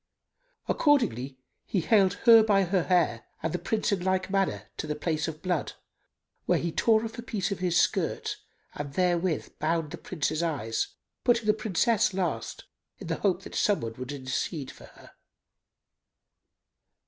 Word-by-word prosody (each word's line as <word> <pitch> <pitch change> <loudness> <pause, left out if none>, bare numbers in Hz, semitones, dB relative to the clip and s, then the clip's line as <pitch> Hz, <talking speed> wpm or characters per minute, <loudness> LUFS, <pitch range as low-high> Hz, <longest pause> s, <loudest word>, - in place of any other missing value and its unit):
Accordingly 135 - +1 0.3
he 190 - 0
haled 195 0 +4
her 230 -2 +9
by 205 -3 +3
her 180 -1 +1
hair 165 -11 +1 0.2
and 160 - -1
the 180 - -1
Prince 220 0 -1
in 190 -3 0
like 185 0 0
manner 195 -1 0
to - - -4
the 150 - -2
place 155 +1 -1
of 160 0 -7
blood, 180 -4 -1 0.7
where - - +4
he 170 - -2
tore 220 +6 +3
off 225 +1 -7
a - - -3
piece 210 -4 -3
of 200 - -3
his 175 -1 +2
skirt - - 0 0.4
and 145 -1 -6
therewith 175 -2 0
bound 160 0 0
the 175 - -7
Prince's 155 -2 -2
eyes 135 -10 -1 0.4
putting 240 -2 +3
the 210 - +4
Princess 215 -1 +1
last, 185 -2 -2 0.3
in - - -9
the - - -1
hope 190 -2 +1
that - - -10
some 205 -2 +2
one 115 -1 -4
would 130 +2 -6
intercede 135 +1 -3
for - - -14
her. - - -17
180 Hz, 165 wpm, -28 LUFS, 155-200 Hz, 0.7 s, her